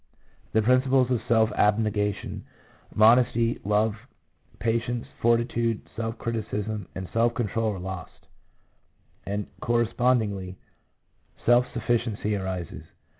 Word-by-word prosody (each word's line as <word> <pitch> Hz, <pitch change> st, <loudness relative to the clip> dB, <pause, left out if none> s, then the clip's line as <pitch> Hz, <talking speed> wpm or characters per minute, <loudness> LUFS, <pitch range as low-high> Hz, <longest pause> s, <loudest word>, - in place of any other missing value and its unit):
The 110 Hz, -, +3 dB
principles 130 Hz, +1 st, +3 dB
of 125 Hz, -, +1 dB
self 110 Hz, -1 st, +3 dB
abnegation, 105 Hz, -1 st, 0 dB, 0.5 s
modesty, 115 Hz, +1 st, +4 dB
love, 105 Hz, +1 st, +2 dB, 0.6 s
patience, 115 Hz, +1 st, -1 dB, 0.2 s
fortitude, 115 Hz, -1 st, +1 dB
self 115 Hz, 0 st, -3 dB
criticism, 110 Hz, -3 st, -3 dB
and 95 Hz, -1 st, -5 dB
self 115 Hz, +1 st, +2 dB
control 115 Hz, -1 st, -1 dB
are -, -, -7 dB
lost, 95 Hz, -1 st, -8 dB, 1.0 s
1 100 Hz, -, -3 dB
and 105 Hz, -1 st, -3 dB
correspond 120 Hz, +1 st, +2 dB
ingly, 95 Hz, -3 st, -5 dB, 0.9 s
self 120 Hz, +1 st, +5 dB
sufficiency 115 Hz, -3 st, -1 dB
arises. 95 Hz, -4 st, -4 dB
115 Hz, 105 wpm, -26 LUFS, 105-120 Hz, 1.0 s, self